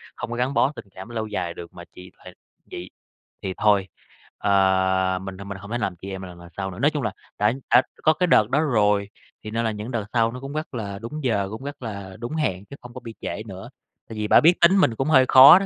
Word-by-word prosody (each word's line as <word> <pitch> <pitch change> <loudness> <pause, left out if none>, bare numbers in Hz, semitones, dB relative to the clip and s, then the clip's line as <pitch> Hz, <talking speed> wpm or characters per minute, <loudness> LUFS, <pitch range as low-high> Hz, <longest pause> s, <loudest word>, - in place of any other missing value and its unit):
không - - -6
có - - -2
gắn 125 +3 0
bó 140 - +3
tình - - -9
cảm 95 +4 -9
lâu 110 -2 -3
dài 90 -5 -3
được 85 -1 -10
mà 85 - -10
chị 90 0 -12
hệt - - -10 0.4
chị 90 +1 -7 0.5
thì 95 - -2
thôi, 100 -3 +3 0.5
ờ, 95 -1 +2
mình 95 -1 -7
thôi 100 - -9
mình 100 -1 -6
không 100 +1 -10
thể 120 - 0
làm 100 -6 -2
chị 95 - -7
em 95 0 -6
mà - - -7
lần 90 -1 -12
lần 85 0 -12
sau 95 -1 -3
nữa." 90 - -9
Nói 145 +4 +3
chung 145 -3 -3
là 105 - -1 0.3
đã 105 +2 +3 0.2
đã 125 - +9 0.2
có 155 - +5
cái 180 +2 0
đợt 110 -9 +4
đó 140 - +3
rồi 105 -8 +2 0.3
thì 105 - -6
nên 115 +1 -1
là 110 - +1
những 105 +3 -6
đợt 115 -4 -2
sau 115 -2 +3
nó 125 - -7
cũng 135 +1 -7
rất 155 -1 -4
là 100 -4 -5
đúng 130 +8 -6
giờ, 100 -5 +1
cũng 110 +4 -7
rất 145 0 -7
là 100 -4 -6
đúng 120 +6 -5
hẹn 95 - -1
chứ 140 - -10
không 125 -1 -11
có - - -7
bị 115 - -9
trễ 110 - -4
nữa. 95 +4 -9 0.4
Tại 110 - -7
vì 105 0 -1
bả - - +7
biết 165 +3 +7
tính 185 +4 +6
mình 120 -12 +3
cũng 135 +4 -1
hơi 130 -4 +6
khó 140 +7 +10
đó, 195 - -2
110 Hz, 275 wpm, -24 LUFS, 95-130 Hz, 0.5 s, khó